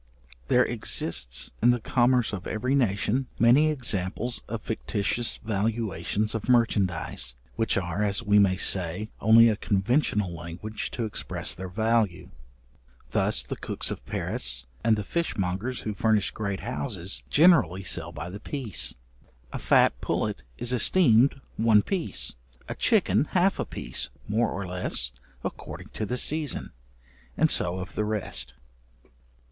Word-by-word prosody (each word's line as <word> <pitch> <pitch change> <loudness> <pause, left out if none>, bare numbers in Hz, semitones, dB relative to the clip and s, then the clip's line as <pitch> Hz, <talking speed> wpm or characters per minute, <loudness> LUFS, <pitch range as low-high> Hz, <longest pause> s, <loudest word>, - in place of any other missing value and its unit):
There - - +4
exists, 65 +2 0
in 120 - +5
the 120 0 +3
commerce 120 0 +2
of 95 -3 -5
every 125 +5 -1
nation, 125 0 +1
many 130 +7 +5
examples 120 -4 -2
of 115 -2 -5
fictitious 110 +1 -2
valuations 105 -1 -1
of 115 +1 -4
merchandize, 100 - +1 0.2
which 115 -3 +1
are, 90 +1 -2
as 100 -1 0
we 105 0 +4
may 95 -2 +3
say, 95 +3 +1
only 115 +2 +7
a 110 - +2
conventional 105 - 0
language 85 +6 -6
to 115 - -2
express 110 - -3
their 95 0 -7
value. 110 -1 0 0.8
Thus - - +2
the - - -5
cooks - - -3
of - - -6
Paris, 60 0 -1 0.2
and 110 -1 +4
the 105 - -3
fishmongers 105 - -2
who 105 - -4
furnish 105 0 +1
great 100 -3 -4
houses, 100 -5 -2
generally 140 - +4
sell 85 -2 0
by 80 +2 -7
the 100 - -8
piece. 110 - -1 0.6
A - - -4
fat - - +3
pullet 65 - -2 0.2
is 120 +1 0
esteemed 125 -1 +5 0.2
one 110 -2 +4
piece, 190 -4 -3 0.3
a - - -3
chicken - - +2
half - - +2
a - - -1
piece, - - -4 0.2
more 110 +2 +1
or 100 0 -4
less, 90 -9 -2 0.3
according - - -7
to 110 - -4
the 125 - -1
season: 150 +2 +1 0.7
and - - +3
so 90 +1 +2
of 95 +1 -7
the 105 - -1
rest. 80 - -1
105 Hz, 140 wpm, -26 LUFS, 95-120 Hz, 0.8 s, only